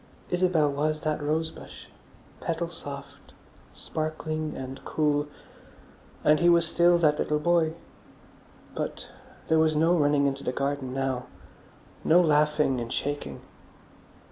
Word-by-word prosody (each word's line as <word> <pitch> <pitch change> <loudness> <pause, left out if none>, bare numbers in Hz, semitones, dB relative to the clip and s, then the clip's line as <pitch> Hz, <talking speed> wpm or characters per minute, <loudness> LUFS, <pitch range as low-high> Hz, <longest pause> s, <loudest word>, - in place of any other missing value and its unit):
Isabel 175 -5 +2
was 155 +2 -1
that 155 -1 -1
rose 160 +2 -1
bush, - - -12 0.5
petal 165 0 -2
soft, 140 -3 -9 0.4
sparkling 155 0 -4
and 130 0 -7
cool. 145 -1 0 1.0
And 150 0 +5
he 175 - +4
was 170 -1 +4
still 175 +1 +4
that 150 -3 +2
little 150 - +1
boy. 165 0 +2 1.0
But - - -5 0.4
there 160 - +3
was 160 -1 +3
no 165 +3 +3
running 145 -3 +3
into 140 0 -1
the - - -1
garden 140 -1 -2
now, 135 -2 -2 0.8
no 165 +3 +5
laughing 150 -5 +2
and 115 0 -5
shaking. 145 +1 -3
150 Hz, 125 wpm, -27 LUFS, 145-160 Hz, 1.0 s, And